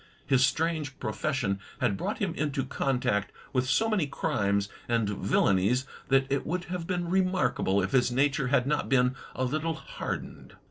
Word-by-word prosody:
His 130 -2 +4
strange 155 0 0
profession 130 -10 -1 0.2
had 100 - +1
brought - - -3
him 190 -5 -1
into 145 -4 -1
contact 125 -7 0 0.2
with 130 -1 +1
so 225 +9 +3
many 205 -9 +1
crimes 100 -10 0 0.2
and 115 -3 +2
villainies 100 +4 +2 0.2
that 135 0 +4
it 140 - +1
would 175 +3 -2
have 175 -2 -4
been 175 -2 -1
remarkable 185 - +1
if 95 - -2
his 125 -2 +3
nature 135 +1 +2
had 125 -1 +3
not 150 +1 0
been 125 -1 +3 0.2
a 130 - -1
little 155 +5 -1
hardened. - - -6
135 Hz, 165 wpm, -28 LUFS, 120-160 Hz, 0.2 s, His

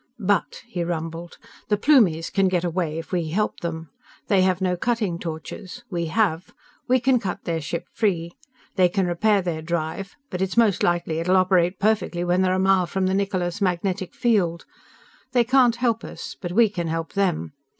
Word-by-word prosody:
"But," 205 +4 0
he 180 -7 -3
rumbled, 165 0 -5 0.3
"_the 210 -1 +2
Plumies 200 - +4
can 195 -1 +3
get 180 -2 0
away 170 -2 -1
if 165 - -7
we 175 -4 -1
help 210 +6 -1
them. 160 -3 -5 0.4
They 195 -2 +4
have 185 -1 +2
no 185 -1 +1
cutting 210 -3 -1
torches. 175 +7 -7
We 170 -2 -2
have. 170 -1 0 0.4
We 255 +1 +4
can 250 +1 +3
cut 195 -1 -4
their 165 -1 -2
ship 165 +3 -4
free. 175 -6 0 0.5
They 180 -1 +5
can 190 +1 0
repair 195 +3 +2
their 165 -3 -3
drive 170 +3 -3 0.2
but 180 -1 -3
it's 190 +3 -2
most 220 -6 +4
likely 170 -2 +1
that - - -1
it'll 180 +3 +3
operate 185 -1 +3
perfectly 210 -4 +1
when 175 +1 +2
they're 185 -1 +2
a 185 - +1
mile 190 -1 +3
from 190 +2 -1
the 190 - +1
Niccola's 190 -1 -1
magnetic 185 0 -1
field. 185 -8 +1 0.7
They 245 -1 +4
can't 250 -1 +4
help 235 -2 0
us. - - -8
But 175 -2 -4
we 230 +3 +5
can 175 -5 -4
help 165 0 -3
them. 190 -7 0
185 Hz, 190 wpm, -23 LUFS, 170-205 Hz, 0.7 s, They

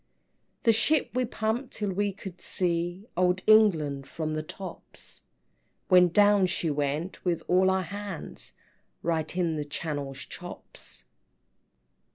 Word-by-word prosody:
VI. - - -46
"The 230 - +6
ship 280 +7 +3
we 255 +1 +1
pumped 230 +3 -2
till 205 -2 -2
we 200 +2 0
could 190 -2 -9
see 175 +2 -1
Old 180 +1 +2
England 160 -11 +4
from 155 -1 -3
the 155 - -1
tops; 180 +3 -8 0.7
When 180 -1 +7
down 205 +1 +5
she 170 -3 0
went 145 +5 -2
with 175 -3 0
all 185 +1 +4
our 190 0 +2
hands, 200 0 -6 0.5
Right 165 0 -1
in 170 -3 +1
the 150 - -1
Channel's 145 -2 -4
Chops." - - -8
180 Hz, 135 wpm, -28 LUFS, 160-205 Hz, 0.7 s, When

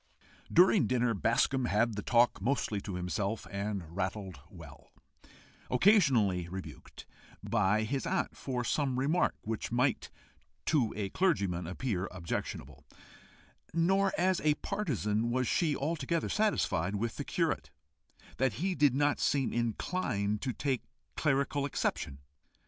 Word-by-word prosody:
During 185 +2 +5
dinner, 125 -2 +1
Bascombe 120 +5 +1
had 110 +3 +2
the 105 - -3
talk 120 -2 +3
mostly 110 -3 0
to 95 -2 -5
himself, 100 +4 -2
and 100 -4 -4
rattled 95 0 -3
well, - - -13 0.8
occasionally 125 - +4
rebuked 95 +1 -9 0.4
by 105 -1 +2
his 135 +7 -2
aunt 190 +2 -1
for 125 -2 -3
some 130 +1 0
remark 150 +7 +1
which 110 0 -4
might 125 +3 +1 0.6
to 135 -8 +2
a 100 -2 -2
clergyman 100 - 0
appear 95 0 -2
objectionable; 85 -2 -5 0.9
nor 190 +4 +3
as 185 +1 +2
a 150 -1 +3
partisan 120 - -1
was 125 +1 0
she 160 -5 +1
altogether 155 +2 -1
satisfied 105 - +1
with 115 +3 -2
the - - -3
curate - - -1 0.7
that 130 -1 +1
he 185 +4 -1
did 145 -6 +3
not 145 +1 +2
seem 140 -3 +1
inclined 110 - -1
to 130 - -1
take 135 0 -1 0.3
clerical 140 -1 +1
exception. 100 - -2
125 Hz, 125 wpm, -31 LUFS, 100-145 Hz, 0.9 s, During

